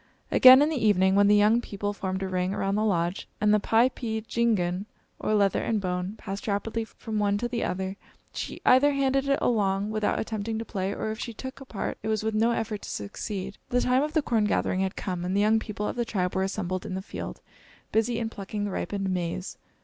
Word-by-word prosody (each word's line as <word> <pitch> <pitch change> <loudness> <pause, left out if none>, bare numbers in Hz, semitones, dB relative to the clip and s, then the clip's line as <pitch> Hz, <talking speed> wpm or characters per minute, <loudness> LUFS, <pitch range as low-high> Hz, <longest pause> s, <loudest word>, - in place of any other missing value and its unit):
Again, 260 +2 +9
in 300 - +2
the 290 -7 -2
evening, 190 -3 +4
when 200 +1 +5
the 205 - +6
young 210 +3 +4
people 205 -2 -4
formed 190 -1 -3
a - - -1
ring 185 +1 -1
around 195 0 -1
the 210 +1 +1
lodge, 175 -3 0
and 210 0 +3
the 210 - +5
piepeendjigun, 225 -5 +1 0.3
or 215 - 0
leather 200 -2 +2
and 220 -2 0
bone, 180 +1 -3
passed 195 +1 -6
rapidly 220 +2 -1
from 220 -1 -5
one 205 -1 +2
to 240 +3 -2
the 240 -1 -2
other, 190 +1 -3 0.4
she - - -5
either 280 +3 +6
handed 275 0 +1
it 275 - +3
along 205 -3 +1
without 215 -1 0
attempting 220 0 -3
to 225 - -4
play, 195 -3 -2
or 215 - -3
if 220 - -6
she 235 - -5
took 260 +3 -8
a - - -9
part, 215 -6 -4
it 220 - -5
was 215 -1 0
with 220 0 -1
no 220 +2 +3
effort 225 -3 -2
to - - -8
succeed. 195 - -5
The 245 0 +2
time 250 +1 +3
of 300 +1 -2
the 315 - +2
corn 225 -5 +1
gathering 185 -2 0
had 190 0 -1
come, 180 -3 -3
and 180 +2 -1
the - - +3
young 215 +1 +4
people 210 -1 -4
of - - -3
the 240 - 0
tribe 185 -5 -1
were 190 - 0
assembled 190 -1 -2
in 185 - -5
the 190 - -4
field, - - -7 0.5
busy 225 +2 +1
in 225 -1 -2
plucking 205 -1 -5
the 205 - -3
ripened 195 +1 -2
maize. 180 0 -3
210 Hz, 230 wpm, -27 LUFS, 190-230 Hz, 0.5 s, Again